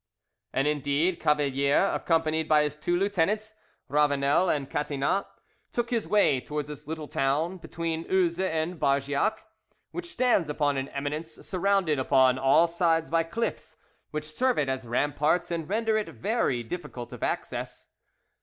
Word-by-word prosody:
And 135 Hz, +2 st, +1 dB
indeed 150 Hz, +4 st, +1 dB
Cavalier, 145 Hz, +2 st, +2 dB
accompanied 160 Hz, -1 st, 0 dB
by 150 Hz, -1 st, +5 dB
his 150 Hz, 0 st, -2 dB
two 175 Hz, +3 st, 0 dB
lieutenants, 205 Hz, +3 st, 0 dB, 0.3 s
Ravanel 145 Hz, +4 st, +2 dB
and 140 Hz, -3 st, 0 dB
Catinat, 145 Hz, +6 st, -1 dB, 0.4 s
took 240 Hz, 0 st, -2 dB
his 230 Hz, -3 st, 0 dB
way 160 Hz, -11 st, +3 dB
towards 150 Hz, +1 st, -4 dB
this 150 Hz, 0 st, -9 dB
little 155 Hz, -1 st, -5 dB
town, 150 Hz, +8 st, 0 dB
between 165 Hz, -1 st, -4 dB
Uzes 180 Hz, -2 st, +1 dB
and 160 Hz, +2 st, -2 dB
Bargeac, 140 Hz, +10 st, +1 dB, 0.5 s
which 350 Hz, 0 st, -6 dB
stands 245 Hz, -, +2 dB
upon 145 Hz, -2 st, 0 dB
an 135 Hz, 0 st, -2 dB
eminence 150 Hz, +3 st, -4 dB
surrounded 190 Hz, -5 st, +1 dB
upon 130 Hz, -1 st, +4 dB
all 135 Hz, +5 st, +5 dB
sides 165 Hz, -1 st, +1 dB
by 165 Hz, 0 st, +3 dB
cliffs, 170 Hz, +8 st, -4 dB, 0.3 s
which 150 Hz, 0 st, -5 dB
serve 255 Hz, +6 st, +1 dB
it 140 Hz, -3 st, +1 dB
as 130 Hz, -2 st, -3 dB
ramparts 145 Hz, +8 st, +1 dB
and 165 Hz, -1 st, -3 dB
render 220 Hz, +1 st, +1 dB
it 215 Hz, -, -2 dB
very 195 Hz, -, -1 dB
difficult 125 Hz, -4 st, -7 dB
of -, -, -9 dB
access. -, -, -3 dB
155 Hz, 145 wpm, -27 LUFS, 145-180 Hz, 0.5 s, by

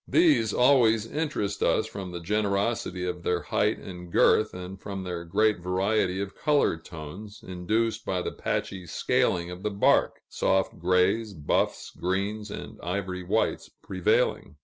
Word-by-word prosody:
These 310 Hz, -, +4 dB
always 120 Hz, -4 st, +4 dB
interest 140 Hz, -8 st, -2 dB
us 110 Hz, -, +2 dB
from 100 Hz, -4 st, -6 dB
the 85 Hz, -, -5 dB
generosity 100 Hz, 0 st, -1 dB
of 90 Hz, -1 st, -3 dB
their 90 Hz, 0 st, 0 dB
height 105 Hz, +1 st, +1 dB
and 90 Hz, -2 st, -9 dB
girth, 110 Hz, +4 st, +4 dB
and 90 Hz, +1 st, -8 dB
from 100 Hz, -1 st, -5 dB
their 90 Hz, -2 st, -4 dB
great 105 Hz, +4 st, +2 dB
variety 95 Hz, +1 st, 0 dB
of 100 Hz, 0 st, -4 dB
color 145 Hz, -, +2 dB
tones, 90 Hz, +7 st, -10 dB
induced 105 Hz, +5 st, -1 dB
by 90 Hz, -1 st, -1 dB
the -, -, -3 dB
patchy 95 Hz, -2 st, -3 dB
scaling 85 Hz, +2 st, +1 dB
of 90 Hz, +1 st, -8 dB
the 105 Hz, -, -1 dB
bark 100 Hz, -1 st, +2 dB
soft 95 Hz, 0 st, 0 dB
grays, 95 Hz, +5 st, +2 dB
buffs, 75 Hz, -2 st, -1 dB
greens, 100 Hz, +4 st, -2 dB
and -, -, -8 dB
ivory 90 Hz, +1 st, -3 dB
whites 100 Hz, +5 st, 0 dB
prevailing. 95 Hz, -5 st, 0 dB
95 Hz, 150 wpm, -27 LUFS, 90-110 Hz, -, These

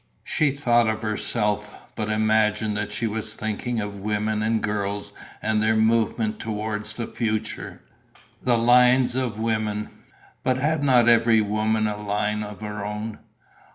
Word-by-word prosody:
She 155 Hz, -, +2 dB
thought 120 Hz, -4 st, +2 dB
of 110 Hz, 0 st, -2 dB
herself, 105 Hz, -1 st, -1 dB, 0.2 s
but 105 Hz, -1 st, -3 dB
imagined 110 Hz, 0 st, +2 dB
that 105 Hz, 0 st, -2 dB
she 115 Hz, -, -1 dB
was 110 Hz, 0 st, -3 dB
thinking 110 Hz, +2 st, -3 dB
of 105 Hz, -1 st, -5 dB
women 105 Hz, +1 st, -1 dB
and 110 Hz, +1 st, +1 dB
girls 105 Hz, -1 st, -3 dB, 0.3 s
and 110 Hz, 0 st, +1 dB
their 110 Hz, +1 st, +3 dB
movement 110 Hz, 0 st, +1 dB
towards 105 Hz, -1 st, -4 dB
the 120 Hz, -, -4 dB
future. 110 Hz, -2 st, -4 dB, 0.6 s
The 120 Hz, -2 st, +2 dB
lines 125 Hz, +1 st, +5 dB
of 125 Hz, -4 st, -1 dB
the 110 Hz, -, -4 dB
women... 110 Hz, -2 st, -1 dB, 0.5 s
but 130 Hz, 0 st, +1 dB
had 150 Hz, +2 st, 0 dB
not 125 Hz, -4 st, +4 dB
every 115 Hz, -1 st, +5 dB
woman 110 Hz, +1 st, 0 dB
a 105 Hz, -1 st, -2 dB
line 105 Hz, +1 st, -1 dB
of 105 Hz, 0 st, -7 dB
her 105 Hz, -1 st, -5 dB
own? 105 Hz, +1 st, -5 dB
110 Hz, 155 wpm, -24 LUFS, 105-115 Hz, 0.6 s, lines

